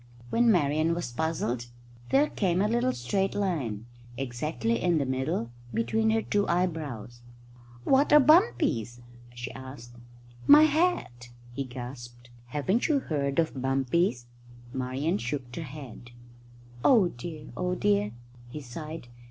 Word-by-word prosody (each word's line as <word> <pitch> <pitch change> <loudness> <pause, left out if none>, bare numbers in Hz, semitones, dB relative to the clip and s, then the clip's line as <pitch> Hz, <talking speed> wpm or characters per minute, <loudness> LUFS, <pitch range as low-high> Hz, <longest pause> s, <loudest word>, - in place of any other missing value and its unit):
When 235 0 +4
Marian 155 -1 +2
was 170 -8 -4
puzzled 125 -5 -2 0.4
there 285 +2 +4
came 180 -3 0
a 205 - +3
little 240 +3 +1
straight 190 +11 -1
line, 140 - -2 0.3
exactly 120 -2 -2
in 175 -2 +2
the 140 - +1
middle, 130 -1 -2 0.2
between 220 - +1
her 220 0 +2
two 205 0 0
eyebrows. 150 - -2 0.6
"What 270 - +3
are 300 - +9
bumpies?" 280 - +3 0.3
she 120 -1 -6
said. 130 -1 -9 0.6
"My 295 +2 +9
hat!" 305 - +1 0.2
he 140 +2 -3
gasped. 120 -1 -9 0.2
"Haven't 150 - 0
you 305 - +2
ever 275 - -1
heard 140 -3 -1
of 165 -1 +2
bumpies?" 135 0 +1 0.5
Marian 130 +1 -1
shook 125 +1 -4
her - - -4
head. 135 -5 -9 0.7
"Oh 215 -9 +5
dear, 150 +3 -8
oh 180 0 -1
dear!" 105 - +1 0.4
he 150 - -6
sighed. 150 +2 -8
145 Hz, 135 wpm, -28 LUFS, 120-185 Hz, 0.7 s, are